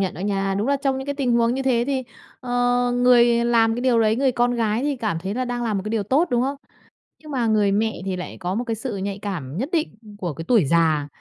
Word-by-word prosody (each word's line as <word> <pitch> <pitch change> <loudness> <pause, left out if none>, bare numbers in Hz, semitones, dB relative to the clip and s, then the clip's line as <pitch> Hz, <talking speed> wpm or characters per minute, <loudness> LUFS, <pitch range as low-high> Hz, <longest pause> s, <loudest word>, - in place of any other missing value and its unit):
nhận 190 -2 -1
đó - - -8
nha. 195 0 -1
Đúng 205 +6 -1
là 280 - +3
trong 270 -1 -1
những 265 - -6
cái 285 - -2
tình 270 -4 0
huống 235 0 +2
như 270 - -2
thế 245 -3 +2
thì, 270 -2 -1 0.4
ờ, 250 - -7 0.4
người 240 -1 +4
làm 230 -1 +3
cái 240 - -3
điều 245 -2 +3
đấy, 220 0 +2
người 265 0 +2
con 245 0 +1
gái 225 0 0
thì 285 -1 -1
cảm 215 -8 -2
thấy 190 +4 -4
là 255 +2 -1
đang 245 -1 -3
làm 215 -3 -1
một - - -4
cái 215 - -4
điều 220 -2 0
tốt, 275 - +1
đúng 240 0 +2
không? 275 +2 -2 0.7
Nhưng 305 - -10
mà 245 -4 0
người 210 -2 +2
mẹ 220 -1 0
thì 190 -1 -2
lại 180 - -7
có 180 +1 -3
một 235 - -1
cái 230 -2 -3
sự 225 -1 -5
nhạy 195 +1 -4
cảm 165 -9 -5
nhất 265 - -2
định 320 -9 -1 0.2
của 175 -6 -4
cái 165 +4 -8
tuổi 225 - +4
già, 155 -1 +2
230 Hz, 280 wpm, -22 LUFS, 195-255 Hz, 0.7 s, người